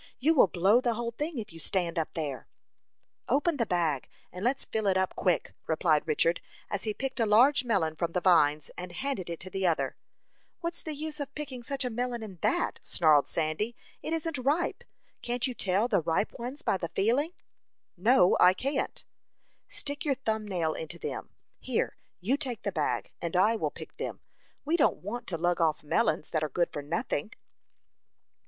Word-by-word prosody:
"You 310 +5 +3
will 270 - +6
blow 195 +7 +4
the 240 -2 +1
whole 235 +1 -2
thing 295 +5 -3
if 210 -7 -5
you 165 - -10
stand 170 0 0
up 160 - -3
there." 145 -6 -3 0.8
"Open 290 +5 +2
the 230 -4 0
bag, 165 -7 0 0.2
and 180 +2 -7
let's 260 +4 +1
fill 220 -2 -1
it 190 -1 +3
up 190 0 0
quick!" 180 -2 +1
replied 160 -1 +2
Richard, 165 +2 +2 0.3
as 205 +1 -2
he 215 - +1
picked 270 -1 -3
a 225 - +4
large 255 +6 +6
melon 190 -10 +1
from 165 +1 -2
the 180 - +2
vines, 155 -5 +4
and 180 0 -7
handed 260 -7 -3
it 170 - -4
to 185 - -7
the 190 0 0
other. 165 - +1 0.6
"What's 335 0 -4
the 310 -2 -4
use 305 +1 -5
of 280 -1 -5
picking 280 -5 -5
such 270 +2 -2
a 250 - -1
melon 240 0 -2
in 195 -5 -9
that?" - - +1
snarled 155 -4 +4
Sandy. 165 +9 -1 0.3
"It - - -4
isn't 325 -3 -1
ripe. 290 +7 0 0.4
Can't 240 0 -1
you 255 - -1
tell 200 0 +1
the 200 -7 +2
ripe 165 +6 0
ones 255 +5 -5
by - - +2
the 170 -3 -4
feeling?" 270 - +1 0.6
"No; 185 -1 +5
I 180 +1 +7
can't." 275 +5 -2 0.6
"Stick 290 +3 -3
your 285 -4 +2
thumb 220 -4 -2
nail 170 -5 0
into 160 +2 -6
them. - - -5 0.3
Here, 255 -3 -1 0.2
you 230 +11 +1
take 255 -7 -4
the 200 - -1
bag, 155 -5 -1
and 170 +1 -3
I 210 +5 +5
will - - 0
pick - - -11
them. - - -4 0.4
We 325 +4 +2
don't 295 - +2
want 235 +5 -5
to 170 - -2
lug 175 +1 +1
off 160 -2 +2
melons 155 +1 +1
that 155 -1 +1
are 155 - -1
good 175 +2 0
for 145 - -3
nothing." 155 - -2
205 Hz, 195 wpm, -29 LUFS, 170-260 Hz, 0.8 s, I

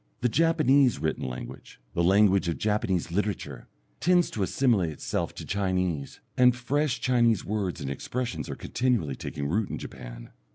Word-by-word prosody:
The 125 - +2
Japanese 145 -3 +3
written 80 -2 -2
language, 60 -1 -8
the 85 - +1
language 95 0 +4
of 85 -4 -1
Japanese 95 -4 0
literature, 95 - -3 0.3
tends 180 -1 +3
to 105 - -4
assimilate 100 -3 +2
itself 75 - -3
to - - -7
Chinese, 90 -7 -2
and 125 -1 +5
fresh 140 +3 0
Chinese 120 -5 +2
words 100 -5 -2
and 70 -1 -3
expressions 125 - -4
are - - -4
continually 115 - -1
taking 70 - -5
root 100 +7 0
in - - -4
Japan. - - -9
105 Hz, 155 wpm, -27 LUFS, 85-125 Hz, 0.3 s, and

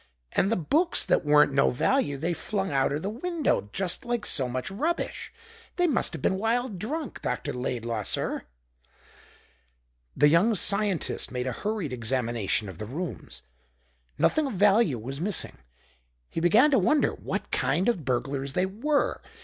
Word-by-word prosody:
And 195 - +1
the - - +3
books 300 - +2
that - - +2
weren't 150 -1 +4
no 135 0 +4
value 145 - +1
they 165 +5 -1
flung 195 +3 -3
out 135 -1 +1
er 145 - 0
the 160 - -5
window 300 - -1
just 190 -2 0
like 240 -2 -2
so 130 -4 +4
much 130 +8 -4
rubbish. 310 - -3 0.4
They 355 - +2
must 300 -8 +2
have - - -7
been 190 - +1
wild 225 -2 -1
drunk, 290 - -5
Dr. 125 - -3
Laidlaw, 120 -3 -3
sir!" - - -2 1.7
The 145 - +6
young 175 +9 +4
scientist 200 -2 +1
made 125 -1 -3
a 130 - -1
hurried 205 - -3
examination 115 -3 0
of 95 -3 -9
the 105 - -5
rooms. 160 - -6 0.7
Nothing 310 -2 +2
of 265 - -5
value 200 - +3
was 135 +6 -6
missing. 200 - -2 0.7
He - - -3
began 225 - +5
to 265 - +4
wonder 300 -1 +2
what - - -5
kind 185 +5 +1
of 215 -10 0
burglars 135 +1 -2
they 180 - +1
were. 265 +10 -1
180 Hz, 160 wpm, -27 LUFS, -, 1.7 s, The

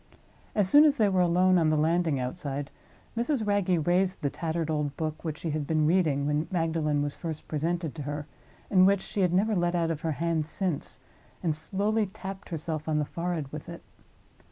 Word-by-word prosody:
As 205 -3 +3
soon 290 +9 +8
as 295 -2 +4
they 215 -3 +4
were 185 -1 +2
alone 180 +1 +4
on 160 -2 +3
the 155 - +2
landing 160 -2 +2
outside, 140 +1 -4 0.4
Mrs. 240 0 0
Wragge 190 -6 +1
raised 180 0 +1
the 140 - +1
tattered 160 0 -2
old 150 -2 -2
book 155 -1 -3
which 155 -3 -3
she 165 - -3
had 150 -1 -2
been 155 -1 +2
reading 155 -4 +2
when 150 +2 0
Magdalen 160 -4 0
was 145 -1 -3
first 160 -3 -6
presented 165 +1 -2
to 155 - -7
her, 145 +1 -4 0.5
and 185 -1 +6
which 200 -1 +3
she 200 - -3
had 180 -2 +3
never 205 +4 +2
let 175 -1 +1
out 165 -1 +1
of 155 -2 -4
her 160 -1 -1
hand 160 +1 -1
since, 175 -3 -2 0.4
and 160 -3 +1
slowly 205 +7 0
tapped 195 0 -8
herself 155 -1 -4
on 155 - +1
the 150 - +1
forehead 170 -3 -3
with 150 +2 -7
it. 170 - -9
165 Hz, 205 wpm, -28 LUFS, 150-185 Hz, 0.5 s, soon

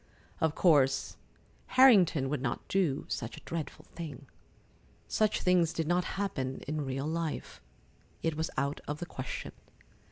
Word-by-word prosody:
Of 160 -1 +1
course 145 -7 +3 0.6
Harrington 190 - +7
would 145 -2 -1
not 120 -3 -3
do 175 -8 +1
such 115 0 -4
a - - -13
dreadful 165 -2 -5
thing. 155 -4 -7 0.8
Such 215 -1 +1
things 175 -3 +3
did 165 -2 -2
not 175 +1 +2
happen 135 -10 -2
in 155 +1 -1
real 135 +1 -3
life. 160 0 -3 0.6
It 165 -1 0
was 160 +1 -1
out 140 +1 -1
of 145 - -2
the 175 - -5
question. 130 -6 -6
160 Hz, 140 wpm, -31 LUFS, 140-175 Hz, 0.8 s, Harrington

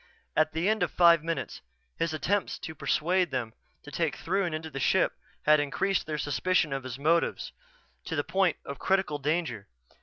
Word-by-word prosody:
At 155 0 +2
the 165 +4 0
end 215 -1 +2
of 175 - +2
five 170 -2 +5
minutes 160 -8 -4 0.3
his 165 - -1
attempts 190 +6 -1
to 160 - -7
persuade 175 +4 +1
them 115 -3 -3 0.3
to - - -11
take - - -1
Throon 185 0 -1
into 155 0 -5
the 135 - -5
ship - - +2 0.3
had 150 0 +5
increased 185 +7 0
their 155 -1 -2
suspicion 150 +1 +1
of 135 -1 -3
his 130 -1 -5
motives 165 +4 +1 0.5
to 165 - -3
the 145 - 0
point 185 +1 +1
of 140 -2 -7
critical 190 -6 +1
danger. 145 - -2
160 Hz, 180 wpm, -28 LUFS, 145-180 Hz, 0.5 s, five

